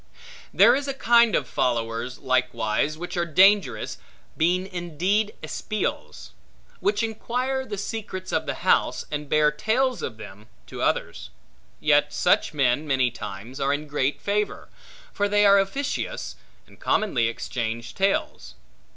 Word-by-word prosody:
There - - +6
is 280 +1 -2
a 275 - -3
kind 235 -4 +4
of 135 - 0
followers 115 +1 -1
likewise, 130 +1 0
which 175 +3 -6
are 175 - +1
dangerous, 185 - +3 0.4
being 180 +3 +1
indeed 185 +4 -1
espials; 215 - -4 0.5
which 205 +2 0
inquire 250 +4 -2
the 205 - -5
secrets 200 -2 -5
of - - -1
the - - -2
house, - - +2
and 150 -1 -4
bear 150 -1 +4
tales 240 - 0
of 110 - -5
them, 105 0 -11 0.2
to - - -8
others. - - -1 0.5
Yet 150 -1 +3
such - - +2
men, 140 0 +1
many 130 -3 +2
times, 105 +4 -8
are 135 0 +1
in 145 +1 -2
great 145 -1 -1
favor; 205 +1 -2 0.4
for 205 0 0
they 205 0 +4
are 200 0 +7
officious, 280 - -3 0.3
and - - -20
commonly 125 - +1
exchange 115 0 -4
tales. 195 - -1
155 Hz, 140 wpm, -24 LUFS, 125-205 Hz, 0.5 s, are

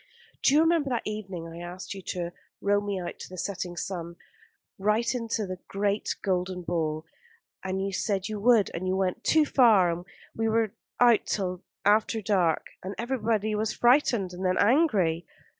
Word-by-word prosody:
"Do 275 - +4
you 305 - +6
remember 325 -3 +2
that 240 -3 -2
evening 195 -6 -5
I 165 0 -9
asked 175 +3 -7
you 195 - -8
to 175 -1 -3 0.3
row 205 0 +2
me 200 -2 -3
out 175 -1 -6
to - - -8
the 185 - -9
setting 180 -1 -4
sun, 170 -3 -4 0.6
right 215 +5 +1
into 230 -3 -2
the 185 -1 -6
great 200 +1 -1
golden 185 -1 -1
ball, 160 -2 -2 0.6
and 190 +1 -2
you 195 - -3
said 195 -1 -1
you 215 -1 -4
would, 225 -1 +4
and 180 +2 -3
you 185 - +1
went 190 -1 -1
too 315 -1 +4
far, 220 -11 +5
and 170 +1 -4 0.3
we 225 0 0
were 220 -1 +1 0.3
out 240 -3 +5
till 185 -2 -2 0.2
after 215 +2 +3
dark, 190 -6 +1 0.2
and 190 +2 -6
everybody 225 -3 0
was 215 +1 -1
first - - -17
frightened 240 -7 +3
and 180 +2 -6
then 185 0 +1
angry?" 200 - +3
200 Hz, 180 wpm, -27 LUFS, 180-225 Hz, 0.6 s, you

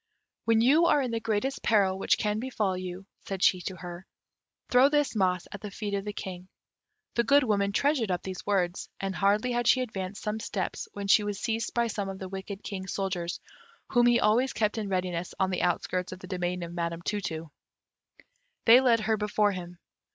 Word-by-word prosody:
"When 225 -1 +4
you 300 +8 +5
are 285 - +4
in 250 - -2
the 230 - -1
greatest 225 +5 -1
peril 195 -4 +2
which - - +2
can 210 0 0
befall 220 -6 -1
you," 185 +1 -6
said 195 -2 -5
she 185 - +4
to 185 +2 -5
her, 175 +1 -9 0.6
"throw 255 +3 +5
this 295 -4 +1
moss 185 -3 +1
at 205 - -8
the 210 - -5
feet 205 +1 -5
of 200 0 -2
the 210 - -2
King." 185 -2 -7 0.7
The 235 - +2
Good 280 +4 +5
Woman 200 -4 +1
treasured 275 -1 +1
up 180 -1 -1
these 185 -1 -6
words, 185 -3 -1
and 195 0 -2
hardly 205 +6 +2
had 240 -1 0
she 260 - +5
advanced 195 -5 -5
some 215 0 -2
steps 195 -3 -3
when 200 0 -5
she 205 +2 +5
was 205 -1 -3
seized 225 +2 -2
by 235 0 +3
some 205 -3 -3
of 190 - -5
the 190 -1 -7
wicked 195 +1 -7
King's 190 -2 -5
soldiers, 185 -3 -2 0.5
whom 240 -1 +5
he 240 0 +5
always 240 +5 +3
kept 215 0 0
in 210 -2 -3
readiness 180 -2 -2
on 190 -1 +2
the 180 - -1
outskirts 180 +1 -1
of 185 - -6
the 185 - -11
domain 180 -1 -2
of 170 0 -7
Madam 170 0 -3
Tu 205 +2 -1
tu. 160 -3 -5 1.1
They 240 +3 +8
led 235 -4 +4
her 220 0 +1
before 210 0 +1
him. 180 -2 -7
200 Hz, 210 wpm, -28 LUFS, 185-225 Hz, 1.1 s, They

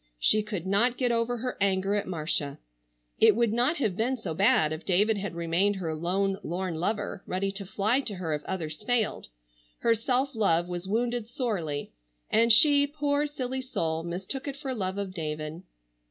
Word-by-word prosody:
She 215 - +3
could 205 -5 -5
not 230 +6 +2
get 250 -2 +1
over 235 +1 0
her 250 +2 -4
anger 195 0 +1
at 205 - -1
Marcia. 155 -5 -2 0.6
It - - +6
would 235 -1 +2
not 245 +8 +2
have 215 -10 0
been 245 +5 0
so 185 -8 -5
bad 195 -3 +3
if 155 - -7
David 205 +3 +2
had 195 -3 -5
remained 170 +5 +1
her 170 -4 -3
lone 190 +5 0
lorn 180 0 -3
lover, 205 +4 -2
ready 195 +2 -1
to 195 -1 -7
fly 215 +7 +1
to 225 -7 -1
her 170 -4 -3
if 150 0 -3
others 160 -4 -4
failed. 230 0 0 0.5
Her 230 - +4
self 255 +4 0
love 175 -6 +2
was 175 +1 -5
wounded 235 +2 -1
sorely, 205 - -3 0.4
and 230 +1 +4
she, 285 +5 +7
poor 290 0 0
silly 260 -3 -4
soul, 165 -11 -2
mistook 185 - -4
it 280 -1 -4
for 275 -2 -4
love 190 -4 -3
of 200 -2 -4
David. 155 -1 -4
200 Hz, 185 wpm, -28 LUFS, 175-245 Hz, 0.6 s, she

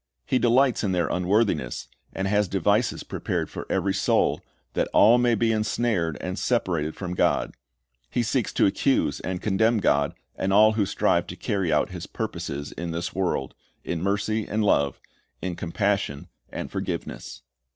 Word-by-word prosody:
He 130 - +1
delights 125 +1 +3
in 95 -3 0
their 85 -2 +1
unworthiness, 90 - 0 0.2
and 95 0 -2
has 105 0 +2
devices 100 +5 +1
prepared - - -3
for - - -7
every - - +1
soul, - - +2 0.3
that - - 0
all 115 +4 +6
may 120 -1 +3
be 115 +1 +2
ensnared 105 -6 0
and 90 +2 -4
separated 85 -10 0
from 90 -2 -5
God. - - +1 0.6
He 120 - 0
seeks 120 0 0
to - - +3
accuse 100 - +1
and 90 -1 -4
condemn 110 +3 +2
God, 70 -8 +2 0.2
and 95 - -1
all 110 +2 +6
who 105 -3 0
strive - - +1
to - - -7
carry 95 -5 -1
out 75 -1 +2
His - - -7
purposes 70 +1 -4
in 85 0 -5
this 85 +1 -3
world, 90 -8 -1 0.3
in 85 -2 -3
mercy 105 +3 0
and 110 +1 0
love, 70 -9 +2 0.4
in 90 -2 -3
compassion 95 -4 -1 0.2
and - - -6
forgiveness. - - -5
100 Hz, 160 wpm, -25 LUFS, 85-110 Hz, 0.6 s, all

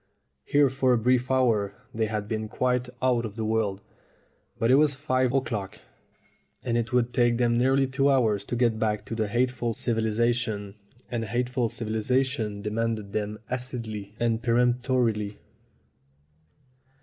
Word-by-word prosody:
Here 145 -2 +3
for 130 -1 +2
a - - +4
brief 125 +2 +2
hour 115 -6 +2 0.2
they 110 -1 0
had 105 -1 -3
been 110 0 -3
quite 125 +2 0
out 125 -2 +2
of 105 -3 -6
the 110 -1 -3
world. 110 -3 0 0.8
But 115 +2 +2
it - - +6
was 145 0 +4
five 130 -3 +1
o'clock, 115 -7 -2 0.9
and 115 - -1
it 120 +1 -1
would 125 -1 +1
take 120 -2 +3
them 120 -1 +2
nearly 135 +2 +3
two 135 +2 +1
hours 110 -7 +2
to 120 - -3
get 120 -2 +1
back 105 -2 -1
to 110 -2 -2
hateful 120 0 0
civilization, 110 -2 0 0.4
and 115 -2 -2
hateful 120 +1 -1
civilization 110 -1 -1
de 105 - -3
manded 110 -2 -2
them 105 0 -2
acidly 115 -5 -5
and 115 -1 +1
peremptorily. 120 -3 +1
120 Hz, 145 wpm, -26 LUFS, 110-125 Hz, 0.9 s, it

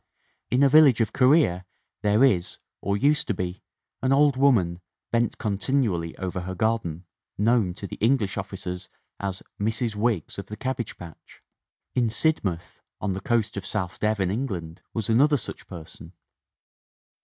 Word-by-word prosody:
In 130 +3 +3
a - - +7
village 140 -4 +6
of 115 - 0
Korea 130 - +4 0.4
there 105 +4 +3
is, 90 -9 +1 0.2
or 100 +1 0
used 145 +7 +2
to 105 - 0
be, 90 0 -4 0.4
an 130 0 +1
old 140 0 +5
woman, 105 -11 +3 0.3
bent 115 0 +1
continually 100 -5 -1
over 95 -1 -3
jher 95 +1 -6
garden, 95 -6 -1 0.3
known 105 -4 +2
to 100 - -7
the - - -7
English 115 -3 +2
officers 95 -2 -5 0.3
as 95 -1 -4 0.2
"Mrs. 110 +2 -1
Wiggs 105 -5 -1
of 100 - -7
the 105 - -7
Cabbage 130 -2 -3
Patch." 85 -3 -13 0.5
In 120 -2 +2
Sidmouth, 100 - -1 0.2
on 100 -1 -1
the 95 - -5
coast 115 -5 0
of 100 - -3
South 95 -3 -3
Devon, 105 -4 +1
England, 95 -9 -4
was 110 -3 -3
another 145 +6 +4
such 120 - -8
person. 85 -4 -11
105 Hz, 155 wpm, -25 LUFS, 90-125 Hz, 0.5 s, a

